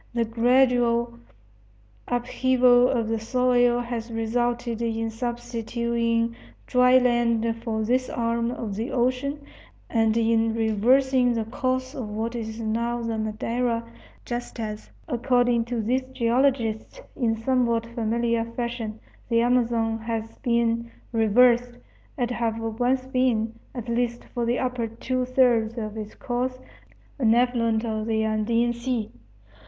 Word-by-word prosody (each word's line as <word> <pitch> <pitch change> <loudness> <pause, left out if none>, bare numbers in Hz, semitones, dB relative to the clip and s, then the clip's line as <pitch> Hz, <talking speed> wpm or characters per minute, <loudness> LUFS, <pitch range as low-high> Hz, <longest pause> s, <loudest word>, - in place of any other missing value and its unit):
The 235 -1 +2
gradual 235 0 +2 0.9
upheaval 250 0 +3
of 230 -4 0
the 225 0 -1
soil 245 +1 +2
has 235 -1 -5
resulted 235 +1 -1
in 225 -1 -1
substituting 235 0 -1 0.3
dry 250 0 +5
land 235 -2 +2
for 220 -2 -1
this 255 +3 +1
arm 230 0 -1
of 230 -4 -4
the 225 +5 -3
ocean 265 +4 -1 0.5
and 225 -1 +2
in 225 0 +2
reversing 245 +4 +3
the 225 -1 -1
course 255 +3 -2
of 250 -8 -5
what 220 +3 -3
is 220 -1 -5
now 235 +2 -1
the 225 -1 -2
Madeira, 230 +2 -1 0.4
just 240 0 -5
as, 215 -1 -5 0.2
according 245 -3 +2
to 235 -2 -2
these 250 +4 +1
geologists, 240 - 0 0.2
in 235 -6 +1
somewhat 235 -1 +1
familiar 235 0 0
fashion 230 -2 -4 0.3
the 230 -1 +3
Amazon 235 -2 +1
has 225 0 -5
been 235 -2 0 0.2
reversed, 240 +2 +3 0.4
it 245 -2 -1
having 225 -2 -2
once 255 +2 +1
been, 250 -4 +1 0.2
at 240 -2 -6
least 235 0 -1
for 240 -2 -1
the 240 +1 +1
upper 250 -2 -1
two 250 +3 -2
thirds 245 -3 +2
of 215 -2 -4
its 215 -1 -7
course, 255 +1 -2 0.6
an 230 -3 +4
affluent 235 -2 +1
of 220 -1 -2
the 220 -1 +1
Andean 230 +2 +1
Sea. 235 -2 -3
235 Hz, 130 wpm, -25 LUFS, 225-245 Hz, 0.9 s, dry